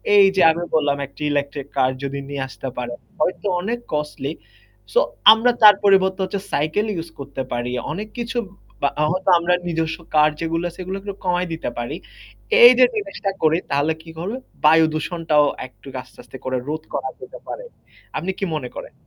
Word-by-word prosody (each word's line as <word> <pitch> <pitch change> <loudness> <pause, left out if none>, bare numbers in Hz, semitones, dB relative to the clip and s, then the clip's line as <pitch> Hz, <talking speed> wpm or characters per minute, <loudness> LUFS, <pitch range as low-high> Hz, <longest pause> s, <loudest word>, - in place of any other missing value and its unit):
এই 200 - +8
যে 190 - +3
আমি 170 +2 -3
বললাম 145 -2 +2
একটা 145 - -17
ইলেকট্রিক 140 -1 -2
কার 130 -1 +3
যদি 140 0 -3
নিয়ে 140 -1 -4
আসতে 135 - -8
পারে। 120 -1 -3 0.3
হয়তো 180 +5 0
অনেক 230 +5 -2
কস্টলি, 150 -1 -2 0.6
সো - - +5 0.3
আমরা 230 +3 +3
তার 210 -2 +10
পরিবর্তে 190 -1 +4
হচ্ছে 190 +1 -2
সাইকেল 155 +9 +1
ইউস 165 0 -5
করতে 140 -1 -5
পারি। 120 0 -2 0.2
অনেক 210 +6 -5
কিছু 240 +1 -3 0.4
বা 140 - +3 0.2
হয়তো 185 +1 -1
আমরা 170 +1 +1
নিজস্ব 160 -1 -1 0.2
কার 150 0 +6
যেগুলো 165 +1 -1
আছে 175 - -16
এগুলাকে 195 +2 -5
কমায় 180 0 +1
দিতে 160 - -3
পারি। 120 +6 -3 0.7
এই 480 +1 +12
যে - - +9
জিনিসটা 295 - -3
করি 160 +1 +4
তাহলে 145 +3 +2
কি 165 - -14
হবে, 195 +8 -3 0.3
বায়ুদূষণটাও 155 -1 +3 0.2
একটু 130 - -20
আস্তে - - -20
আস্তে 130 +2 -11
করে 130 0 -1
রোধ 155 +1 -3
করা - - -2
যেতে - - -10
পারে। - - -6 0.5
আপনি 190 +2 -2
কি 195 - 0
মনে 125 -5 -4
করেন? - - -8
160 Hz, 175 wpm, -21 LUFS, 145-190 Hz, 0.7 s, এই